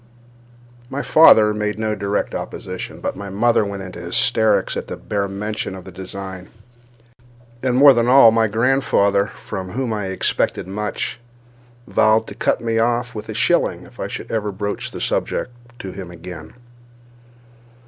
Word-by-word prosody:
My 140 +1 -3
father 110 -9 +6
made 105 0 -2
no 110 -1 -1
direct 100 0 -2
opposition; - - -6
but - - -3
my 100 0 -7
mother 110 +3 +2
went 100 -1 -5
into 90 -2 -8
hysterics 110 +5 +1
at - - -4
the - - -6
bare 100 -1 -2
mention 105 0 -4
of 95 - -9
the 95 - -10
design; 95 0 -8 1.1
and, 130 -2 0
more 140 +1 +8
than 120 -1 +1
all, 125 -2 +8
my 115 0 +3
grandfather, 105 -3 +2
from 95 -3 -7
whom 125 -2 -2
I 105 -3 -3
expected 95 -1 -1
much, 105 +4 -4 0.7
vowed 110 -2 +3
to - - -9
cut 115 - 0
me 115 -1 0
off 120 +1 0
with 105 -2 -7
a - - -5
shilling - - +1
if - - -17
I - - -2
should - - -7
ever 105 -2 -1
broach 100 +1 -4
the - - -8
subject - - -1 0.3
to 95 - -7
him 90 -1 -8
again. 85 -2 -10
105 Hz, 160 wpm, -20 LUFS, 95-115 Hz, 1.1 s, more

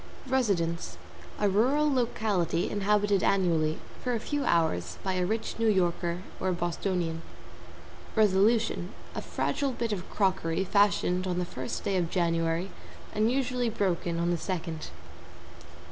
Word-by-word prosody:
=RESIDENCE= 170 - 0 0.4
A 210 - +3
rural 255 +10 +3
locality 215 -9 0
inhabited 205 -1 +2
annually 165 -5 +2 0.3
for 250 -1 0
a - - -1
few 290 +5 -2
hours 160 - +1
by 190 - 0
a 180 -1 0
rich 220 +2 -2
New 225 - +2
Yorker 175 -3 +1 0.2
or 185 - 0
Bostonian. 175 -1 -2 0.9
=RESOLUTION= 210 -2 +3 0.2
A - - -4
fragile 280 -3 -1
bit 235 -2 -2
of 190 -3 -4
crockery 185 -3 +1
fashioned 190 -2 +2
on 180 -1 -1
the 180 - 0
first 130 -6 -5
day 195 - 0
of 175 -2 0
January 165 +1 0 0.4
and 215 +2 +2
usually 250 -2 0
broken 180 -5 -1
on 170 +1 +1
the 170 - 0
second. 165 -4 -4
190 Hz, 135 wpm, -29 LUFS, 170-215 Hz, 0.9 s, A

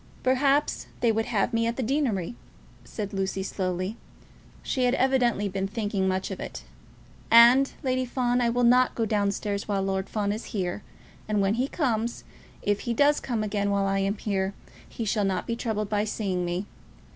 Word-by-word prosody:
"Perhaps 275 +3 +2
they 235 - +3
would 225 0 -1
have 225 +1 0
me 230 0 +2
at 235 - -1
the 260 - -2
deanery," 240 - 0 0.5
said 205 -1 -6
Lucy 195 0 -2
slowly. 185 +2 -3 0.7
She 255 -3 0
had 250 +1 +3
evidently 250 -6 +2
been 195 0 -2
thinking 205 -2 -1
much 190 +1 -1
of 190 - -5
it - - -7 0.7
all. 230 - +8
"And, 250 +4 +7
Lady 255 -1 +1
Fawn, 245 0 0
I 235 - +2
will 245 +1 +1
not 250 +1 +4
go 225 - 0
down 205 -2 +1
stairs 200 0 -3
while 200 -2 0
Lord 190 0 -2
Fawn 205 -2 -1
is 215 +3 -4
here; 180 +1 -2 0.5
and 210 -1 +1
when 195 0 +2
he 250 +4 0
comes, 235 -7 -1 0.4
if 205 0 +1
he 235 -1 -2
does 290 +3 +4
come 230 -4 -2
again 205 -1 -1
while 200 -1 +1
I 195 0 +1
am 195 +2 0
here, 195 -2 -2 0.3
he 230 - -5
shall 210 0 +1
not 195 -1 -1
be 230 - -2
troubled 215 -3 -2
by 210 0 +1
seeing 195 -4 -2
me. 175 +3 -2
215 Hz, 190 wpm, -26 LUFS, 195-240 Hz, 0.7 s, all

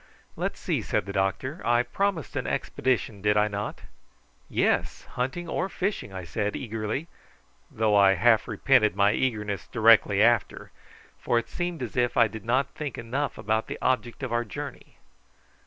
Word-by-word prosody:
"Let's - - -3
see," - - -1
said - - -1
the 100 - -6
doctor. 100 - -1
"I 120 +1 +3
promised 195 - -2
an - - -2
expedition 115 -5 -1
did 105 +1 +2
I 105 0 +4
not?" 105 0 -5 0.7
"Yes: - - 0
hunting 135 +8 -3
or 185 +3 -2
fishing," 195 - -3
I 95 -1 -6
said 105 +4 -2
eagerly, 110 +5 -3 0.6
though 110 -1 +1
I 100 -1 +6
half 115 +4 +3
repented 110 -2 +3
my 100 +1 +4
eagerness 105 -6 -2
directly 110 -3 +5
after, 115 -1 +2 0.5
for 120 - +1
it 115 0 -1
seemed 175 -2 -3
as 120 - -6
if 125 -1 +1
I 115 -2 +6
did 110 +1 -9
not 130 +4 +1
think 150 -4 -5
enough 130 +5 -3
about 110 +2 -1
the - - -5
object 130 0 -1
of 125 -3 -3
our 120 0 +1
journey. 105 -6 -8
115 Hz, 165 wpm, -26 LUFS, 105-130 Hz, 0.7 s, I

